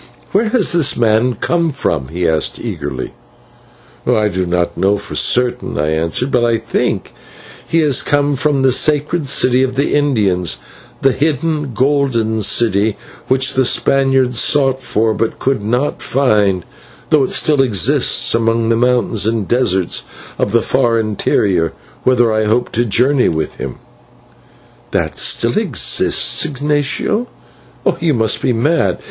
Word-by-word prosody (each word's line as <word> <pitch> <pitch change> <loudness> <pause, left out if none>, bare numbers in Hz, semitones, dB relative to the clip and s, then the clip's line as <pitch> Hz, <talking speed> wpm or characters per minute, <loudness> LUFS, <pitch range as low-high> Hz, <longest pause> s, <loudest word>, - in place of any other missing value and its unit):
"Where 215 +3 +1
has 225 -4 +1
this 165 -5 +1
man 115 +1 +1
come 170 -2 0
from?" 80 - -2
he 85 +3 -2
asked, 80 -1 0
eagerly. - - -6 0.9
"I 105 -1 +2
do 90 -1 -3
not 85 0 -1
know 100 +2 +1
for 100 - -10
certain," 125 0 0
I 75 +1 0
answered, 80 +12 -1
"but 125 - +1
I 115 -1 +2
think 115 -2 -2
that - - -19 0.6
he 165 - +1
has 145 -4 +2
come 145 0 0
from 140 0 0
the 130 - +4
sacred 150 +3 +1
city 130 -1 +3
of 130 -1 -1
the 140 +2 0
Indians, 100 - +1 0.5
the 135 - +4
hidden 150 -1 -2
Golden 125 -4 0
City 105 0 +2 0.3
which 130 0 +2
the 130 - +2
Spaniards 135 -1 +1
sought 135 -2 +2
for 110 -3 0
but 115 +1 -2
could 130 -6 -1
not 125 +7 -2
find, 105 -9 +1 0.5
though 150 -3 +4
it - - -5
still 150 -3 +2
exists 105 -10 +2
among 115 0 0
the 115 - +2
mountains 120 -3 +1
and 110 -3 -1
deserts 95 -8 0 0.3
of - - 0
the 115 0 +2
far 120 -3 +1
interior, 100 -5 0 0.3
whither 120 -3 +3
I 110 0 0
hope 110 +3 0
to 120 +1 0
journey 125 +5 +2
with 80 -1 -4
him." - - -6 1.1
"That - - -2
still - - +1
exists! - - +2
Ignatio, 150 - -2 0.7
you 160 -4 +1
must 110 -1 +1
be - - 0
mad. 120 - 0
125 Hz, 150 wpm, -15 LUFS, 105-140 Hz, 1.1 s, the